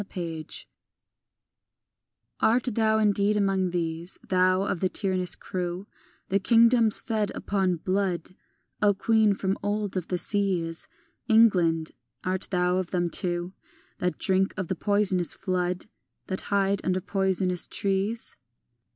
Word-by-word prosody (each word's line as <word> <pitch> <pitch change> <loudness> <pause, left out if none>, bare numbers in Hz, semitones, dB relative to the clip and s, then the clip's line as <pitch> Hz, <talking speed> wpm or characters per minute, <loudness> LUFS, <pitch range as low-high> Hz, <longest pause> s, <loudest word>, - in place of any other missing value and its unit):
AN - - -7
APPEAL 165 -4 -6 1.9
I - - +3
ART 245 0 +1
thou 220 0 +2
indeed 210 -1 +2
among 195 -2 +1
these, 170 0 -2
Thou 185 0 +2
of 200 -3 -2
the 185 - 0
tyrannous 185 -3 +2
crew, 180 +1 -5 0.4
The 195 - +2
kingdoms 230 +1 +4
fed 215 -3 -2
upon 190 -3 -1
blood, 185 0 -2 0.5
O 205 -1 +3
queen 220 0 +2
from 190 0 -2
of 195 - -1
old 205 -1 -2
of 180 - -4
the 180 - -2
seas, 175 -3 -2 0.4
England, 180 -8 +3 0.3
art 185 +1 -3
thou 180 -1 +1
of 185 -2 -3
them 175 -2 -1
too 175 0 +1 0.5
That 180 0 -2
drink 190 0 0
of 190 -4 -4
the 190 - -1
poisonous 195 -2 +1
flood, 180 -1 -2 0.4
That 190 - -2
hide 200 -1 +1
under 185 0 0
poisonous 190 -2 +3
trees? 200 +3 -2
190 Hz, 135 wpm, -26 LUFS, 180-205 Hz, 1.9 s, kingdoms